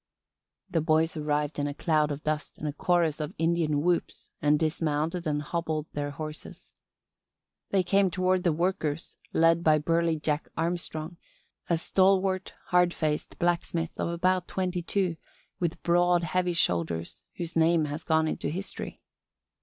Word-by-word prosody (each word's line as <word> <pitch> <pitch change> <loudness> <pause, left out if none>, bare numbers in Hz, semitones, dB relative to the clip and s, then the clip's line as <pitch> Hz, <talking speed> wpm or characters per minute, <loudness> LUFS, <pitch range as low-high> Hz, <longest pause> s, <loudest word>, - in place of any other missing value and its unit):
The 165 - 0
boys 160 +1 +2
arrived 150 -1 -1
in 145 - 0
a 145 - -4
cloud 155 -2 +2
of 145 0 -5
dust 155 -1 -2
and 155 - -4
a 145 - -2
chorus 165 -1 +1
of 155 +4 -4
Indian 165 -3 +1
whoops 175 0 -1
and 150 0 +4
dismounted 160 +2 -1
and 150 -1 0
hobbled 160 -1 -2
their 145 0 -2
horses. 155 +1 -8 1.0
They 195 -2 +2
came 195 +2 +3
toward 185 +1 +1
the 175 - +3
workers, 160 -2 -1
led 165 +1 +4
by 155 -2 +5
burly 165 +2 +1
Jack 150 0 -1
Armstrong, 165 0 -2 0.5
a 170 - +3
stalwart, 190 +1 +2
hard 180 -1 +4
faced 150 -2 -2
blacksmith 170 -1 0
of - - -2
about 180 +1 +1
twenty 185 -1 -2
two 180 -1 0 0.4
with 170 -2 -2
broad, 175 0 +3
heavy 180 +2 0
shoulders, 85 - -1
whose 170 -1 -5
name 165 -1 +4
has 150 +2 -5
gone 160 -1 +2
into 150 - -2
history. 185 +6 -6
165 Hz, 150 wpm, -28 LUFS, 150-175 Hz, 1.0 s, by